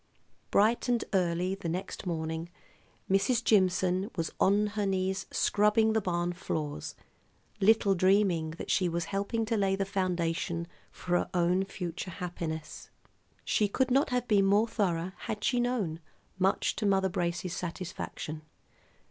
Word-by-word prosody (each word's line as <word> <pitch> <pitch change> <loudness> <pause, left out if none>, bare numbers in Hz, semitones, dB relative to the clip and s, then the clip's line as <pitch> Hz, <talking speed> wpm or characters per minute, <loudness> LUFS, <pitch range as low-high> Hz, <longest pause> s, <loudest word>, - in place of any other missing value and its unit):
'" - - -40
Bright 225 +4 +3
and 240 -2 +1
early 180 0 +1
next 180 +3 -4
morning 160 0 -3 0.6
Mrs. 230 +5 +2
Jimson 185 -1 +2
was 165 -3 -2
on 205 +2 +4
her 205 -1 0
knees 190 0 -1
scrubbing 210 +2 +3
the 220 - +2
barn 175 -2 -1
floors, 150 - -4 0.6
little 205 -1 +4
dreaming 185 -3 +3
that - - -4
she 185 -2 +2
was 170 0 -2
helping 200 +3 -1
to 225 +1 0
lay 195 -2 +2
the 195 0 -1
foundation 175 -3 -1 0.3
for 175 -1 0
her - - -3
own 180 +2 +2
future 180 -2 -5
happiness. 170 -4 -6 0.6
She 210 - +2
could 255 +5 0
not 275 +3 +3
have 250 -1 -1
been 200 -3 +4
more 205 +3 +4
thorough, 185 -5 -1
had 210 -1 -5
she 245 +1 +2
known, 230 -10 -1 0.4
much 190 +1 +2
to 210 - 0
Mother 190 -1 +3
Brace's 175 -1 -2
satisfaction. 170 -3 -5
190 Hz, 145 wpm, -30 LUFS, 175-210 Hz, 0.6 s, on